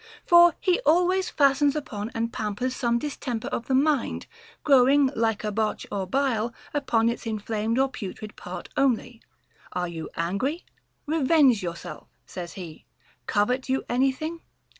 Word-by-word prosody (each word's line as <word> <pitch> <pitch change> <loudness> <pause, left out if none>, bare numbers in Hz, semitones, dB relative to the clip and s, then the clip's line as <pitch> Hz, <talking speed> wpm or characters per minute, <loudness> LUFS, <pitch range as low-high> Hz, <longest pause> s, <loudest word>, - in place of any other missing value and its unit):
For 345 -1 +7
he 365 -1 +2
always 360 +5 +2
fastens 280 0 +3
upon 215 -8 -4
and 230 0 -2
pam 210 -2 -3
pers 255 +3 -2
some 235 -2 +1
distemper 245 -3 -4
of 235 - -4
the 265 - +2
mind, 285 -1 +1 0.4
growing, 275 0 +5
like 225 -2 0
a 210 - -1
botch 215 +1 -1
or 195 -2 -2
bile, 235 -1 0 0.2
upon 235 -6 +1
its 235 0 -2
inflamed 220 +1 -2
or 270 +1 +3
putrid 210 -3 -8
part - - -8
only. 245 -3 0 0.5
Are 180 0 -1
you 165 -2 -6
angry"? 200 - -2 0.4
Revenge 290 -6 +4
yourself, 170 -2 -7 0.2
says 175 -2 -7
he. 170 -5 -10 0.4
Covet 250 +6 0
you 265 +1 +1
anything? 270 +7 0
245 Hz, 145 wpm, -25 LUFS, 215-280 Hz, 0.5 s, For